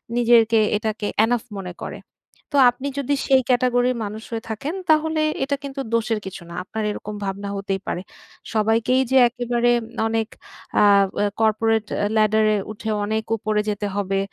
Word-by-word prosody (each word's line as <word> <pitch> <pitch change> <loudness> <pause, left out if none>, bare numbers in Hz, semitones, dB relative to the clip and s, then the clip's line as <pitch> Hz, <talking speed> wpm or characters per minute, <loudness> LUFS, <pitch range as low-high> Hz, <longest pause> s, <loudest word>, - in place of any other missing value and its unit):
নিজেকে 230 -2 +4 0.2
এটাকে 215 0 -3 0.2
এনাফ 240 0 0 0.2
মনে 180 -2 -6
করে। - - -6 0.5
তো - - +2
আপনি 260 +3 -6
যদি 280 +1 0
সেই 265 -1 +5
ক্যাটেগরির 250 0 +2
মানুষ 215 +2 -7
হয়ে 225 0 -4
থাকেন, 245 +9 -4 0.2
তাহলে 315 0 +3 0.2
এটা 280 +1 0
কিন্তু 275 0 -6
দোষের 225 -1 +1
কিছু 190 - -7
না। - - -9
আপনার 220 +3 -5
এরকম 210 0 -6
ভাবনা 200 +1 -4
হতেই 195 -1 -2
পারে। 175 - -2 0.5
সবাইকেই 225 +4 +2
যে 265 - +5
একেবারে 240 0 0 0.4
অনেক 225 -1 -1 0.5
আ - - +6 0.4
এ - - +3 0.2
corporate 220 0 +2 0.2
আ - - +2
ladder 215 0 +3
এই 205 - -1
উঠে 215 +1 -6 0.2
অনেক 220 +1 -1
উপরে 210 0 0
যেতে 205 0 -2
হবে। 195 -1 0
225 Hz, 165 wpm, -22 LUFS, 210-245 Hz, 0.5 s, আ